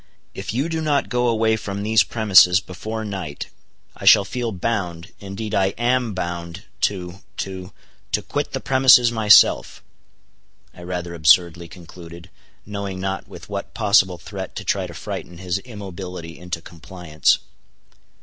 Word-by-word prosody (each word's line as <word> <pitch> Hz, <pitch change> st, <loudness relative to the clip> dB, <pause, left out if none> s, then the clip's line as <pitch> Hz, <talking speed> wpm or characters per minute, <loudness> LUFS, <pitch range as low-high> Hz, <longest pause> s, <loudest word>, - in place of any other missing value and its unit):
"If -, -, -6 dB
you 130 Hz, +8 st, -1 dB
do 165 Hz, -1 st, -3 dB
not 145 Hz, -3 st, 0 dB
go 125 Hz, -1 st, +1 dB
away 110 Hz, -1 st, +2 dB
from 100 Hz, -2 st, -5 dB
these 110 Hz, +2 st, +4 dB
premises 95 Hz, -5 st, +5 dB
before 110 Hz, +4 st, -6 dB
night, 95 Hz, -8 st, -6 dB, 0.5 s
I -, -, -9 dB
shall 100 Hz, -, +7 dB
feel 120 Hz, +1 st, -3 dB
bound—indeed 100 Hz, +1 st, -4 dB
I 95 Hz, -1 st, +1 dB
am 120 Hz, -2 st, 0 dB
bound—to—to—to 90 Hz, +2 st, -5 dB
quit -, -, -3 dB
the -, -, -2 dB
premises 125 Hz, -2 st, +5 dB
myself!" 110 Hz, -2 st, +4 dB, 0.9 s
I -, -, -14 dB
rather 90 Hz, -1 st, -5 dB
absurdly 85 Hz, +1 st, +3 dB
concluded, 85 Hz, 0 st, -13 dB, 0.3 s
knowing 100 Hz, -2 st, -5 dB
not 95 Hz, 0 st, -4 dB
with -, -, -12 dB
what -, -, -6 dB
possible 100 Hz, -4 st, +3 dB
threat 95 Hz, +2 st, -8 dB
to -, -, -5 dB
try -, -, -1 dB
to -, -, -11 dB
frighten 90 Hz, -, -7 dB
his 90 Hz, +1 st, -2 dB
immobility 95 Hz, -7 st, -8 dB
into 90 Hz, -1 st, -6 dB
compliance. 85 Hz, -2 st, -1 dB
95 Hz, 130 wpm, -21 LUFS, 90-110 Hz, 0.9 s, shall